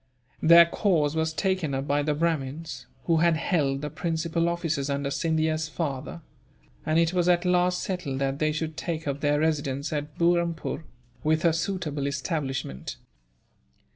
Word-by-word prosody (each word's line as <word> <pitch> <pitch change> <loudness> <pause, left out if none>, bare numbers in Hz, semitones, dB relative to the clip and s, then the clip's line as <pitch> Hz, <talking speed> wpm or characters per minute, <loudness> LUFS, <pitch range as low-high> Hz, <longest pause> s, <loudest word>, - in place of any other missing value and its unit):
Their 170 +1 +8
cause 165 -4 +1
was 160 0 +1
taken 180 -4 0
up 135 +1 -2
by 145 +1 +1
the 150 0 0
Brahmins, 150 -3 -2 0.2
who 165 -2 +2
had 170 0 +3
held 145 -5 0
the 150 - -3
principal 165 +1 -1
offices 160 -5 -1
under 140 0 -1
Scindia's 160 0 0
father; 150 0 -4 0.6
and 155 +1 +1
it 165 +1 +3
was 180 -1 +2
at 175 0 +3
last 180 0 +2
settled 180 -8 -3
that 135 +1 -1
they 155 0 +2
should 155 +1 -3
take 160 -3 -3
up 140 0 -2
their 145 0 +2
residence 145 -2 -1
at 150 0 -4
Burrampoor, 170 -1 0 0.4
with 155 +2 +2
a 165 - +5
suitable 165 -5 -2
establishment. 135 - -3
160 Hz, 155 wpm, -26 LUFS, 145-170 Hz, 0.6 s, Their